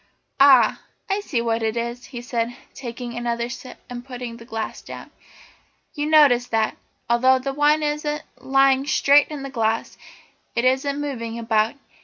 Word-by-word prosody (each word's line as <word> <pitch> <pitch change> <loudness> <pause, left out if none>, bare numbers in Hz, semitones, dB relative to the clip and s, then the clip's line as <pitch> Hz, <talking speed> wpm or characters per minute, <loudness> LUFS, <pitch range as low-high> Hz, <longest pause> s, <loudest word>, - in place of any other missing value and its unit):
"Ah, 270 -2 +6 0.3
I 395 - +1
see 290 -12 -2
what 230 0 0
it 220 +1 -1
is," 235 +1 -4
he 240 -1 -8
said, 240 -1 -2 0.2
taking 240 -1 -7
another 235 0 -2
sip 250 +1 -9
and 245 -1 -7
putting 245 -2 -7
the 230 - -13
glass 225 -2 -5
down. - - -10 0.8
"You 295 0 -2
notice 285 -6 +5
that, 220 -1 0 0.3
although 255 +2 +4
the 270 +1 -4
wine 295 +2 +3
isn't 300 +1 -2 0.2
lying 270 0 +3
straight 285 -1 +5
in 295 -3 -7
the 275 - -6
glass, 225 -3 -1 0.6
it 235 - +1
isn't 270 +2 +1
moving 235 -6 -4
about. 225 0 +1
250 Hz, 160 wpm, -22 LUFS, 235-280 Hz, 0.8 s, Ah